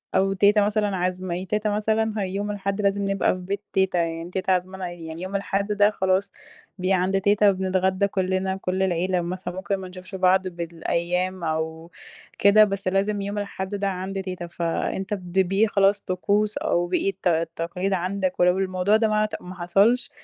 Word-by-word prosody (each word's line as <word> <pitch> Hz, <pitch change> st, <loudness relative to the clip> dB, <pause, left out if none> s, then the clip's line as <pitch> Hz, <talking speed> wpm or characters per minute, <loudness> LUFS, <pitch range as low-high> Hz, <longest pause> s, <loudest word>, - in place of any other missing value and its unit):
أو 195 Hz, +1 st, +3 dB
تيتة 205 Hz, +1 st, +4 dB
مثلًا 205 Hz, -2 st, 0 dB
عازمة 180 Hz, 0 st, -2 dB
ي 185 Hz, -, -5 dB
تيتة 210 Hz, +3 st, -1 dB
مثلًا 220 Hz, +1 st, +1 dB
هي 195 Hz, -3 st, -1 dB
يوم 205 Hz, +1 st, -2 dB
الأحد، 200 Hz, 0 st, -2 dB
لازم 200 Hz, 0 st, +1 dB
نبقى 195 Hz, -, +2 dB
في -, -, -7 dB
بيت 195 Hz, +3 st, -4 dB
تيتة 190 Hz, -2 st, +2 dB
يعني. 165 Hz, 0 st, -2 dB
تيتة 185 Hz, +1 st, -1 dB
عازمانا 185 Hz, 0 st, -3 dB
يعني، 165 Hz, -1 st, -8 dB
يوم 185 Hz, +2 st, -5 dB
الأحد 200 Hz, +1 st, -1 dB
ده 205 Hz, 0 st, +4 dB
خلاص، 190 Hz, -1 st, 0 dB, 0.5 s
بي 185 Hz, +1 st, +1 dB
عند 190 Hz, +1 st, +1 dB
تيتة، 205 Hz, +1 st, +4 dB
بنتغدَّى 190 Hz, +1 st, +1 dB
كلَّنا، 190 Hz, -1 st, -1 dB
كل 190 Hz, 0 st, -1 dB
العيلة 180 Hz, 0 st, +1 dB
مثلًا. 180 Hz, +1 st, -5 dB
ممكن 190 Hz, +1 st, -2 dB
ما 190 Hz, -1 st, -7 dB
نشوفش 185 Hz, +1 st, -10 dB
بعض 185 Hz, 0 st, +3 dB
بالأيام 175 Hz, +1 st, -2 dB
أو 160 Hz, +1 st, -3 dB, 0.5 s
كده، 200 Hz, +2 st, +7 dB
بس 195 Hz, -2 st, -2 dB
لازم 200 Hz, +2 st, +1 dB
يوم 200 Hz, +1 st, -4 dB
الأحد 200 Hz, -1 st, -4 dB
ده 200 Hz, 0 st, -1 dB
عند 195 Hz, +1 st, -3 dB
تيتة. 185 Hz, -2 st, -5 dB
فأنت 170 Hz, +4 st, -2 dB
بد 185 Hz, -1 st, -2 dB
بيه 195 Hz, +4 st, +3 dB
خلاص، 200 Hz, 0 st, +3 dB
طقوس، 205 Hz, +3 st, 0 dB
أو 175 Hz, 0 st, 0 dB
بقى 185 Hz, +2 st, +1 dB
الت 195 Hz, -1 st, -3 dB
التقاليد 170 Hz, +3 st, -1 dB
عندك. 185 Hz, +1 st, -1 dB
ولو 180 Hz, +1 st, +4 dB
الموضوع 185 Hz, +2 st, +1 dB
ده 220 Hz, 0 st, +2 dB
ما 215 Hz, 0 st, +1 dB
عت 215 Hz, 0 st, -2 dB
ما 180 Hz, +1 st, -9 dB
حصلش، 200 Hz, +8 st, +2 dB
190 Hz, 185 wpm, -24 LUFS, 180-200 Hz, 0.5 s, كده